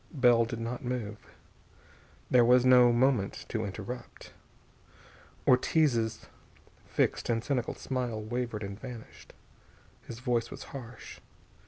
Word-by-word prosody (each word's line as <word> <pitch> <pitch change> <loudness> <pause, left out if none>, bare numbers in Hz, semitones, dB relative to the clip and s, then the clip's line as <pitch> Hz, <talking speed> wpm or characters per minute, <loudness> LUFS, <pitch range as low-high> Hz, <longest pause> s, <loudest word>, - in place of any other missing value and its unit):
Bell 120 -5 +4
did 115 0 -5
not 120 +3 -4
move. 115 -4 -4 1.1
This 125 - +6
was 125 +1 +5
no 125 -1 +7
moment 120 -4 +1
to 110 -1 -2
interrupt. 105 +5 -8 1.1
Ortiz's 125 -4 +2 0.6
fixed - - 0
and 115 -1 +1
cynical 125 -4 -1
smile 125 -4 -3
wavered 115 0 -3
and 100 +1 -6
vanished. 125 -3 -10 0.7
His 115 - -8
voice 120 -1 -1
was - - -8
harsh. 125 -3 -9
120 Hz, 115 wpm, -30 LUFS, 115-125 Hz, 1.1 s, no